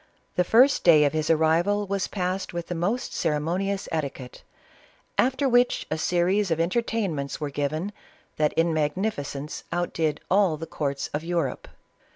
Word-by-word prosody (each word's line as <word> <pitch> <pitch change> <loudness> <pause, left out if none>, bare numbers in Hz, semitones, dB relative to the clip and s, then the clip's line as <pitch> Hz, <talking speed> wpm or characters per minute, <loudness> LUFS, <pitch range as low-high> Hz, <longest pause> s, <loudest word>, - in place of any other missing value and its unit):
The 180 - +3
first 250 +9 +4
day 155 -4 +7
of 145 - +1
his 155 -1 -1
arrival 165 +6 +2
was 195 -1 -1
passed 185 -1 -3
with 170 -1 -5
the - - -1
most 200 +9 -2
ceremonious 175 +6 -1
etiquette, 140 -5 -4 0.7
after 265 +2 +2
which 245 0 +3
a 155 - 0
series 180 +4 +1
of 165 -1 0
en 170 +2 +1
tertainments 195 - -1
were 150 -2 -3
given 155 +8 -2 0.4
that 150 -1 +2
in 165 0 +2
magnificence 150 -2 -2
outdid 165 -3 -1
all 190 -5 +3
the 165 - -6
courts 140 -3 -3
of 150 +2 -2
Europe. 170 0 -2
170 Hz, 155 wpm, -25 LUFS, 155-195 Hz, 0.7 s, day